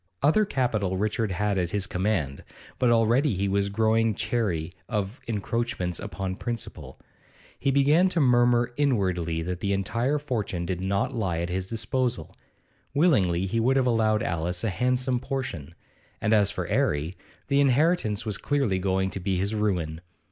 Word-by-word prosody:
Other 185 +9 +4
capital 110 - 0
Richard 105 +2 0
had 100 +1 0
at 85 -2 -1
his 100 +1 -2
command, 95 -9 -1 0.4
but 125 - +3
already 120 +3 +3
he 100 +2 0
was 100 0 +1
growing 110 +1 +2
chary 100 -8 -1 0.2
of 105 +3 -3
encroachments 110 -4 -2
upon 95 -1 -4
principal. 120 -2 -6 0.6
He 140 - +1
began 145 +7 +4
to 175 - -1
murmur 120 -2 +3
inwardly 95 - 0
that 90 +1 -4
the 100 +1 0
entire 115 +9 0
fortune 110 -11 -3
did 90 0 -3
not 100 +1 0
lie 95 -8 -1
at 85 +1 -2
his 95 +1 -2
disposal; 125 +2 -2 0.6
willingly 95 - +3
he 115 +4 -1
would 130 +4 +2
have 130 - +3
allowed 110 -3 +2
Alice 85 +2 -1
a 110 - 0
handsome 125 +4 +1
portion; 120 - -5 0.4
and 105 - +1
as 105 -2 +4
for - - -3
'Arry, 75 +5 0 0.3
the 140 -1 +3
inheritance 140 - +2
was 105 -3 -3
clearly 135 -10 0
going 95 0 0
to - - -4
be 95 0 -1
his 100 +4 -1
ruin. 90 -7 -1
105 Hz, 160 wpm, -26 LUFS, 95-125 Hz, 0.6 s, Other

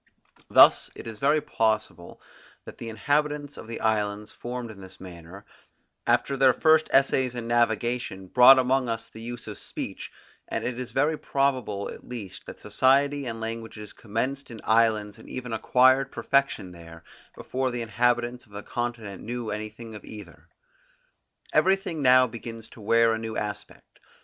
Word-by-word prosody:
Thus - - +7
it - - -10
is 110 -2 -8
very 150 +4 +3
possible 110 - -2 0.5
that - - -11
the 115 - -6
inhabitants 145 +5 -1
of - - -10
the 115 - -6
islands 105 -1 -1
formed 120 -1 -6
in 100 -2 -13
this 95 0 -12
manner, 90 +2 -11 0.6
after 140 - +2
their 135 -1 +4
first 155 0 +4
essays 130 -2 +2
in 120 -1 -5
navigation, 120 -3 0
brought 125 +7 +8
among 130 -1 +2
us 115 0 -3
the 110 - -12
use 120 +1 -7
of - - -8
speech; - - -6 0.4
and - - -3
it 125 0 -3
is 125 - -5
very 150 +3 +1
probable 130 -8 -1
at - - -13
least 110 -7 -8
that - - -9
society 140 +1 +2
and 115 -1 -5
languages 110 -2 -6
commenced 130 +6 -3
in 115 -2 -9
islands 110 -2 +2
and - - -14
even 125 -2 -5
acquired 130 +4 +3
perfection 140 -9 0
there, 85 -1 -13 0.3
before 130 0 -2
the 120 -1 -3
inhabitants 120 +2 0
of 105 - -22
the 100 0 -7
continent 115 -5 -4
knew 120 -2 -4
anything 110 +2 -7
of 105 - -10
either. 105 -1 -12 1.1
Everything 190 -5 +2
now 130 -1 +6
begins 115 -1 -8
to 115 - -14
wear 115 +2 +4
a 110 - -2
new 110 -1 -5
aspect. 105 -1 -7
115 Hz, 160 wpm, -26 LUFS, 110-130 Hz, 1.1 s, brought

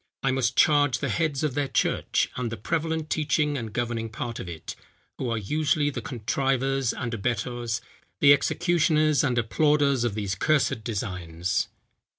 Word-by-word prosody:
I 135 - +2
must 130 -1 0
charge 145 -4 +4
the - - -2
heads 155 -4 0
of 150 -4 0
their 145 0 0
church, - - 0
and 120 -3 -3
the 115 - -4
prevalent 160 - -2
teaching 150 -1 +1
and 115 -5 -4
governing 115 0 -2
part 115 +1 -5
of 90 - -6
it, 80 -2 -7 0.4
who 125 - -2
are 115 - 0
usually 145 +6 +1
the - - -5
contrivers 135 +1 0
and 120 -2 -4
abettors, 120 +1 -2 0.4
the 145 -1 +8
executioners 155 -1 +2
and 130 -4 +1
applauders 140 +2 +2
of 115 -4 -1
these 100 -3 -2
cursed 135 +1 +1
designs." 90 -5 -2
130 Hz, 160 wpm, -26 LUFS, 115-145 Hz, 0.4 s, the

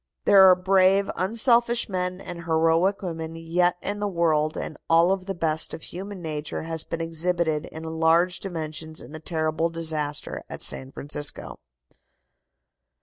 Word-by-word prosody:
There 190 -1 +8
are 185 - +7
brave, 190 +1 +3
unselfish 235 +4 +2
men 180 -2 -2
and 170 -3 -8
heroic 165 +5 +2
women 165 -2 -5
yet 170 +2 +1
in 205 +1 -2
the 205 - -1
world, 160 -4 +1
and - - -5
all 165 +2 +5
of 190 -1 -2
the 195 - -3
best 160 -2 0
of 160 - -12
human 190 0 -8
nature 155 -1 -4
has 160 -1 -4
been 165 - -5
exhibited 165 -1 -1
in 160 - -9
large 165 +2 +2
dimensions 160 -3 -6
in - - -11
the 155 - -8
terrible 160 0 -1
disaster 155 -3 -3
at - - -6
San 130 0 -3
Francisco. 145 +1 -3
165 Hz, 150 wpm, -25 LUFS, 160-185 Hz, -, There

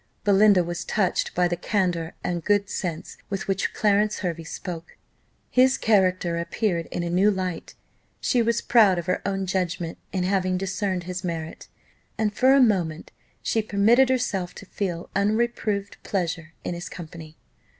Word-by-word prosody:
Belinda 200 -2 +5
was 175 +1 -4
touched 195 -4 0
by 180 0 +3
the 175 - -1
candour 175 -3 -1
and 170 -2 -2
good 205 -1 +1
sense 170 -4 -4
with 195 -2 -3
which 195 -1 0
Clarence 210 0 +1
Hervey 170 -3 -3
spoke. 170 0 -7 0.5
His 260 +1 +4
character 185 -5 +2
appeared 170 -1 -1
in 175 - -3
a 170 - -2
new 190 +4 +4
light: 185 -4 -3 0.4
she 245 - +2
was 235 0 +1
proud 215 -6 +5
of 170 - -3
her 185 +1 0
own 195 -1 -1
judgment, 180 -3 -2
in 185 -2 -1
having 185 -1 +1
discerned 190 -1 -2
his 180 +2 -5
merit, 165 -2 -5 0.5
and 215 -1 0
for 260 +4 +4
a - - +5
moment 180 -10 +1 0.3
she 225 - +1
permitted 220 +5 +4
herself 205 -8 -1
to - - -10
feel 180 -3 -4
"unreproved 210 -1 0
pleasure 170 -4 -3
in - - -3
his 175 0 -6
company." 160 -2 -10
190 Hz, 160 wpm, -25 LUFS, 175-210 Hz, 0.5 s, Belinda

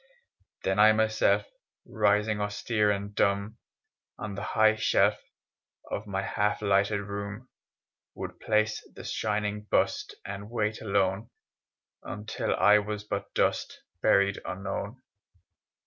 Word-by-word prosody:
Then 95 +2 0
I 110 +1 +8
myself, 110 -2 +2 0.4
Rising 105 0 +1
austere 105 +1 0
and 100 0 -2
dumb 100 +3 0 0.6
On 105 -2 -5
the 100 - -5
hight 110 +1 +3
shelf - - +3 0.7
Of 105 +1 -3
my 95 -1 -2
half 105 +2 0
lighted 100 +1 +2
room, 100 +4 -6 0.7
Would - - -7
place 110 0 +1
the - - -9
shining 105 -1 -1
bust - - +1
And 100 +1 -6
wait 110 -2 -1
alone, 100 +1 0 0.7
Until 105 +3 -3
I 105 +2 +6
was 105 0 -4
but 100 -1 -4
dust, - - 0 0.2
Buried 100 0 +3
unknown. 100 +6 -5
105 Hz, 115 wpm, -28 LUFS, 100-110 Hz, 0.7 s, I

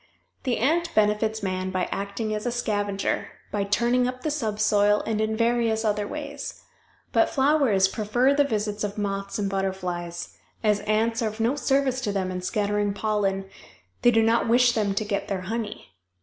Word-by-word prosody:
The 250 -3 +1
ant 335 +7 +1
benefits 215 0 +2
man 185 -1 -2
by 185 -1 0
acting 200 +2 -3
as 210 +2 -3
a - - 0
scavenger, 205 -4 -1 0.2
by 205 -1 0
turning 240 +5 +2
up 255 0 -5
the 310 - 0
subsoil, 210 -5 +2
and 220 -1 -1
in 220 0 0
various 230 -1 +1
other 210 -1 0
ways. 290 +1 -6 0.5
But - - +3
flowers 265 -9 +3
prefer 230 +7 +1
the 285 0 +4
visits 210 -5 -2
of 205 0 -3
moths 200 -1 -2
and 205 -2 -1
butterflies; 185 -3 -3 0.3
as 210 -1 +3
ants 225 +2 +1
are 225 - +1
of 215 +1 -6
no 235 +5 +2
service 270 -2 +1
to 210 - -1
them 190 -2 -1
in 180 0 -4
scattering 205 +1 0
pollen, 200 -2 0 0.6
they 240 - +6
do 225 -1 +4
not 230 +1 +2
wish 245 +1 +5
them 210 -4 0
to 215 - -1
get 205 -1 -2
their 195 -2 -2
honey. 215 - -5
215 Hz, 180 wpm, -25 LUFS, 200-235 Hz, 0.6 s, they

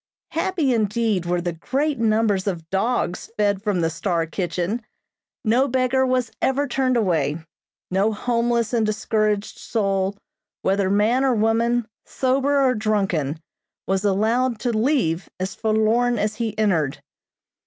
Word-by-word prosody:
Happy, 330 -5 0
indeed, 215 -4 0
were 175 0 0
the 175 0 -2
great 270 - -1
numbers 215 -3 +2
of 170 -4 -3
dogs 195 -2 -1
fed 205 -2 +1
from 205 -4 0
the 165 - +1
"Star" 170 0 -1
kitchen. 180 +6 -2 0.6
No 245 +5 +3
beggar 260 0 +1
was 255 -3 0
ever 275 +2 +1
turned 255 -1 +1
away. 160 -9 +1 0.5
No 195 +4 +2
homeless 235 +1 0
and 230 -2 +2
discouraged 215 -1 -1
soul, 195 -3 -1 0.5
whether 195 0 +1
man 215 +6 +2
or 260 -3 +3
woman, 230 +2 +1 0.2
sober 275 +2 +1
or 255 - +3
drunken, 195 - 0 0.5
was 195 +1 0
allowed 225 +5 +1
to 240 -3 0
leave 215 - +1
as 185 +1 -3
forlorn 225 +2 +1
as 210 +1 -1
he 220 -2 -3
entered. 170 -10 0
215 Hz, 135 wpm, -22 LUFS, 195-245 Hz, 0.6 s, No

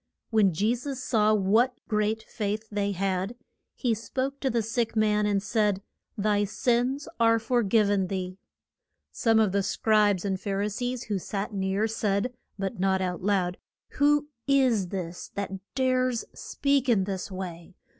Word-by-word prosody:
When 215 -4 +4
Je 205 +8 +1
sus 260 +2 -4
saw 215 -4 +2
what 220 +6 +2
great 215 0 0
faith 215 0 -3
they 205 -1 0
had, 190 +3 -1 0.4
he 245 -4 +1
spoke 260 +5 -3
to 270 - 0
the 230 -2 +1
sick 230 +1 -1
man, 210 -1 +2
and 200 -1 +1
said, 210 -2 +1 0.3
Thy 205 0 +2
sins 245 +6 0
are 230 0 +5
for 240 +2 +1
giv 215 0 +3
en 200 -2 +1
thee. 185 0 -4 0.7
Some 225 -1 +3
of 215 -3 +3
the 200 +1 +2
Scribes 205 -1 +2
and 190 -1 -1
Phar 200 -1 -1
i 210 - 0
sees 245 +3 -3
who 205 -3 -2
sat 200 +3 -4
near 195 +2 0
said, 215 +1 -1 0.2
but 195 +1 -3
not 190 0 +2
out 180 -1 -2
loud, 185 -2 0 0.3
Who 295 +1 +2 0.2
is 255 -8 +3
this 175 -2 -5
that 200 -1 -3 0.2
dares 255 -2 +1
speak 280 -2 0
in 210 -5 +4
this 190 0 -4
way? 180 -2 -7
210 Hz, 165 wpm, -27 LUFS, 195-235 Hz, 0.7 s, are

